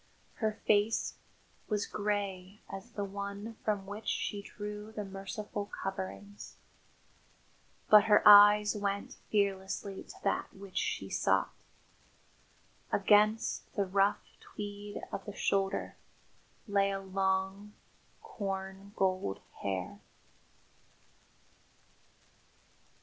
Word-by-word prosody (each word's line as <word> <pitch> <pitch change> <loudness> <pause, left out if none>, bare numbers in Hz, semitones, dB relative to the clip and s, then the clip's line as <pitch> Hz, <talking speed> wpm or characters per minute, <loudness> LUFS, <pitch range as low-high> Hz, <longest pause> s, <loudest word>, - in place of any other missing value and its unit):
Her 220 -2 0
face 210 +1 +2 0.6
was 210 -2 0
grey 200 -2 -3
as 205 +5 -9
the 205 - -2
one 200 +3 -6
from 205 -2 0
which 205 +3 -8
she 205 - -1
drew 210 +1 -7
the 210 -2 -5
merciful 195 +1 -5
coverings, 195 +1 -6 1.3
but 210 -1 +8
her 210 -1 +5
eyes 210 +1 +9
went 200 -1 -2
fearlessly 195 -1 -1
to - - -12
that - - 0
which 195 -1 -5
she - - -2
sought. - - +2 1.4
Against 215 +2 +3
the 200 - +1
rough 195 +2 +2
tweed 205 0 -7
of 195 - -5
the 205 - -7
shoulder 195 -1 0 0.7
lay 200 -1 +3
a 195 0 -2
long, 190 +1 -1 0.5
corn 195 - -5
gold 185 - 0 0.2
hair. 95 -2 -3
200 Hz, 95 wpm, -32 LUFS, 195-210 Hz, 1.4 s, eyes